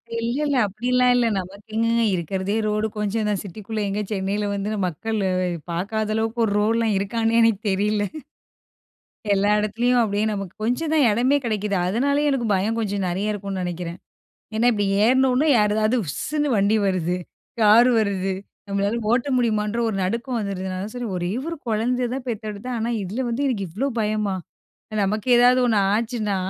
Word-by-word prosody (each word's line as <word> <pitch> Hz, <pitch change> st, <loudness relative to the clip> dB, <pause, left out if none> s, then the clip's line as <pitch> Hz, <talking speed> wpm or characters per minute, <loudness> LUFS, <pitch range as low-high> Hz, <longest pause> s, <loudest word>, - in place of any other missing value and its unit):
இல்ல 230 Hz, +2 st, -1 dB
இல்ல. 285 Hz, -2 st, +1 dB
அப்படிலாம் 250 Hz, +5 st, +2 dB
இல்ல 245 Hz, -1 st, +3 dB
நமக்கு 195 Hz, +2 st, -7 dB
எங்கேங்க 230 Hz, +1 st, +2 dB
இருக்கிறதே 190 Hz, +4 st, -2 dB
ரோடு 210 Hz, +1 st, 0 dB
கொஞ்சம் 210 Hz, +1 st, -1 dB
தான் 205 Hz, -3 st, 0 dB
சிட்டிக்குள்ள, 210 Hz, +3 st, -6 dB
எங்க 205 Hz, +2 st, -1 dB
சென்னையில் 200 Hz, +1 st, -1 dB
வந்து, 200 Hz, +1 st, -2 dB, 0.2 s
மக்கள் 220 Hz, +7 st, -3 dB, 0.5 s
பார்க்காத 215 Hz, +5 st, -2 dB
அளவுக்கு 225 Hz, +1 st, -1 dB
ஒரு 210 Hz, -, -1 dB
ரோடுலாம் 225 Hz, +1 st, +2 dB
இருக்கான்னே 225 Hz, +3 st, 0 dB
எனக்கு 225 Hz, -3 st, +3 dB
தெரில. 205 Hz, +2 st, +1 dB, 1.3 s
எல்லா 200 Hz, +1 st, +2 dB
இடத்துலயும் 235 Hz, +4 st, +1 dB
அப்படியே 205 Hz, 0 st, 0 dB
நமக்கு 195 Hz, -3 st, -5 dB
கொஞ்சம் 250 Hz, +8 st, -1 dB
தான் 300 Hz, -4 st, +4 dB
இடமே 250 Hz, +6 st, +3 dB
கிடைக்குது 210 Hz, -3 st, -1 dB
அதனாலயே 280 Hz, +9 st, +1 dB
எனக்கு 250 Hz, -4 st, 0 dB
பயம் 210 Hz, +4 st, 0 dB
கொஞ்சம் 200 Hz, -3 st, -1 dB
நிறைய 195 Hz, +4 st, -1 dB
இருக்கும்ன்னு 195 Hz, -2 st, -4 dB
நினைக்கிறேன். 175 Hz, -1 st, -4 dB, 0.6 s
ஏன்னா 230 Hz, +2 st, +2 dB
இப்படி 205 Hz, -2 st, 0 dB, 0.2 s
ஏறினோன 260 Hz, +4 st, +3 dB
யாரதாவது 215 Hz, +3 st, +2 dB
உஸ்ன்னு 295 Hz, -, -2 dB
வண்டி 200 Hz, +2 st, +3 dB
வருது, 180 Hz, -2 st, 0 dB, 0.4 s
கார் 220 Hz, +3 st, +7 dB
வருது, 195 Hz, -3 st, 0 dB, 0.4 s
நம்மளால 200 Hz, +2 st, 0 dB
ஓட்ட 245 Hz, +4 st, +1 dB
முடியுமா 225 Hz, -4 st, +1 dB
என்ற 225 Hz, +3 st, -3 dB
ஒரு 215 Hz, -, -2 dB
நடுக்கம் 235 Hz, +5 st, -2 dB
வந்துடுதுனால, 190 Hz, -1 st, -4 dB
சரி 245 Hz, -1 st, -4 dB
ஒரே 175 Hz, +1 st, -2 dB, 0.2 s
ஒரு 335 Hz, -, -4 dB
குழந்தைய 240 Hz, +3 st, 0 dB
தான் 265 Hz, -1 st, -6 dB
பெத்தெடுத்தேன் 220 Hz, +2 st, -4 dB
ஆனா 225 Hz, +1 st, -1 dB
இதில 215 Hz, +8 st, -3 dB
வந்து 270 Hz, +5 st, -1 dB
எனக்கு 200 Hz, -7 st, -2 dB
இவ்வளோ 250 Hz, +11 st, -1 dB
பயமா 210 Hz, -2 st, 0 dB, 0.7 s
நமக்கு 210 Hz, +4 st, -2 dB
ஏதாவது 245 Hz, +1 st, +5 dB
ஒண்ணு 225 Hz, -3 st, +2 dB
ஆச்சுன்னா. 220 Hz, -2 st, -1 dB
215 Hz, 155 wpm, -23 LUFS, 200-235 Hz, 1.3 s, கார்